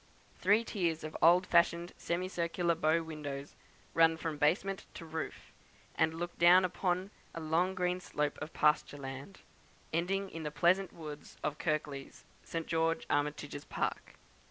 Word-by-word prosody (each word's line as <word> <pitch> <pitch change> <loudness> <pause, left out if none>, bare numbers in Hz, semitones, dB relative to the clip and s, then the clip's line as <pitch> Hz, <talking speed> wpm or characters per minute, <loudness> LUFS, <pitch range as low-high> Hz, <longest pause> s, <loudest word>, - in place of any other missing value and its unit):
Three 205 +4 +4
tiers 170 -8 -1
of 155 0 -6
old 175 +3 +6
fashioned 170 0 +3
semicircular 170 -1 -1
bow 165 0 +2
windows 145 -3 -6 0.4
run 165 0 +5
from 160 -2 -4
basement 190 +6 +1
to 165 - -8
roof; 160 -1 -6 0.4
and 160 0 +1
look 175 +1 -4
down 180 +2 +7
upon 185 +1 -1 0.2
a - - -3
long 165 +4 +1
green 180 0 0
slope 150 -4 -2
of 160 - -5
pasture 150 -1 +2
land, 135 +6 -8 0.5
ending 190 +4 0
in 165 - -6
the 150 - -3
pleasant 175 +6 +2
woods 150 -3 -9
of 150 0 -2
Kirklees, 150 -4 -3 0.2
Sir 165 - -3
George 165 0 0
Armitage's 145 0 -1
park. - - -3
165 Hz, 145 wpm, -33 LUFS, 150-180 Hz, 0.5 s, down